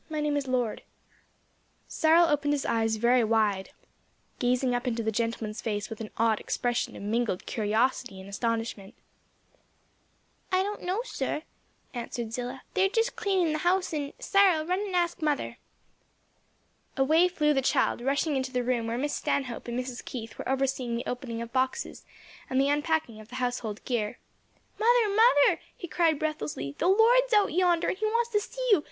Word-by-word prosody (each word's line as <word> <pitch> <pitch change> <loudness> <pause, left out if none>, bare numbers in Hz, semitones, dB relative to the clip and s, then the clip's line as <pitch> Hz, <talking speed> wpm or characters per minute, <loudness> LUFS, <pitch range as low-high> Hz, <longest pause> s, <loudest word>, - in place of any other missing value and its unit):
My 310 -1 -3
name 300 -1 0
is 285 -2 -1
Lord." 245 -4 -1 1.1
Cyril 325 +2 +4
opened 290 -2 +1
his 280 - -3
eyes 225 -1 +1
very 240 +2 +3
wide; 215 -3 +1 0.7
gazing 250 0 +1
up 245 +1 -2
into 230 -1 -1
the 220 - 0
gentleman's 225 -1 -2
face 205 -1 -3
with 225 - -6
an 215 - -5
odd 225 -1 +2
expression 240 -1 -2
of - - -8
mingled 220 -2 -1
curiosity 220 0 0
and 190 - -10
astonishment. 225 0 -3 1.6
"I 370 0 +3
don't 415 +1 -4
know, 375 +6 -1
sir;" 320 -9 -3 0.5
answered 235 -2 -5
Zillah, 250 +2 -5
"they're 385 -1 +3
just 455 +3 0
cleaning 380 -6 +1
the 310 - -1
house 360 +2 +1
and 290 -2 -3
Cyril, 380 -6 +3
run 365 +3 0
and 400 -3 -3
ask 345 -1 0
mother." 300 -2 -1 1.4
Away 315 +6 +4
flew 300 -4 +1
the 270 - +2
child, 255 - +1
rushing 280 +4 0
into 260 -1 -2
the 250 -1 0
room 240 -2 0
where 230 +1 -2
Miss 290 +3 -1
Stanhope 255 -4 -2
and 240 +1 -2
Mrs. 250 -1 -5
Keith 225 -3 -7
were - - -4
overseeing 265 -3 0
the 235 - -4
opening 240 -2 -4
of 235 - -11
boxes 260 - -1 0.4
and 260 - +1
the 275 +1 +3
unpacking 295 -6 0
of 215 - -12
the 250 - -9
household 245 -4 -3
gear. 220 -4 -1 0.6
"Mother, 465 0 +4
mother," 440 -10 +5 0.2
he 350 - -6
cried 325 -2 +2
breathlessly, 150 - -3
"the - - +2
Lord's 475 +5 +5
out 415 -5 +3
yonder 350 -1 +2
and - - -2
he 435 - 0
wants 465 +2 +1
to 420 - +3
see - - -5
you! 400 - +7
265 Hz, 175 wpm, -28 LUFS, 230-345 Hz, 1.6 s, you